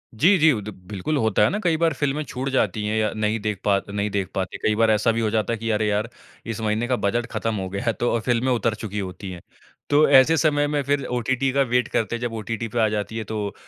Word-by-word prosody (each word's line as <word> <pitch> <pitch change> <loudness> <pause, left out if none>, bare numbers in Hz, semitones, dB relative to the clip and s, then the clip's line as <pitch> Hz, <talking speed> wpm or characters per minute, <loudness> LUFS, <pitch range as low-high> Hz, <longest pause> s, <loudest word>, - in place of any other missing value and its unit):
जी, 180 - +5
जी, 160 0 +6
उ 110 -7 -1
द 105 - -7 0.2
बिल्कुल 105 +10 -2
होता 110 -6 +1
है - - +4
ना 205 - -2
कई 165 -3 +2
बार 165 0 +2
फ़िल्में 145 +1 -1
छूट 135 -1 -4
जाती 115 -5 0
है 110 +1 -1
या 110 -1 +1
नहीं 110 +1 0
देख 105 -2 -3
पा 100 -1 +4
नहीं 100 +1 -2
देख 100 -2 -2
पाते। 95 -1 -3
कई 110 - +2
बार 115 0 +3
ऐसा 110 +2 +3
भी 115 +1 -1
हो 110 - +1
जाता 110 +1 0
है 115 - -4
कि 115 +1 -3
अरे 105 0 +1
यार 105 +2 0 0.4
इस 115 -1 -4
महीने 110 +2 0
का 125 - +1
बजट 120 +2 0
खत्म 115 -1 -2
हो 95 -2 -4
गया 100 +1 -4
है 115 - +2
तो 120 - -1
अ, - - +1
फ़िल्में 120 +3 0
उतर 115 -2 0
चुकी 105 -2 -5
होती 95 0 -6
है। 90 -2 -9 0.5
तो 145 +1 +5
ऐसे 140 +4 +6
समय 145 -2 +2
में 145 0 0
फिर 140 0 0
ओटीटी 125 +2 0
का 140 +1 +2
वेट 125 -2 +1
करते 115 +1 -1
है - - -5
जब 120 -2 -3
ओटीटी 115 +1 -4
पे 115 +2 -3
आ 110 - +4
जाती 105 +1 -3
है 110 - -3
तो 105 -2 -3
115 Hz, 275 wpm, -23 LUFS, 105-130 Hz, 0.5 s, जी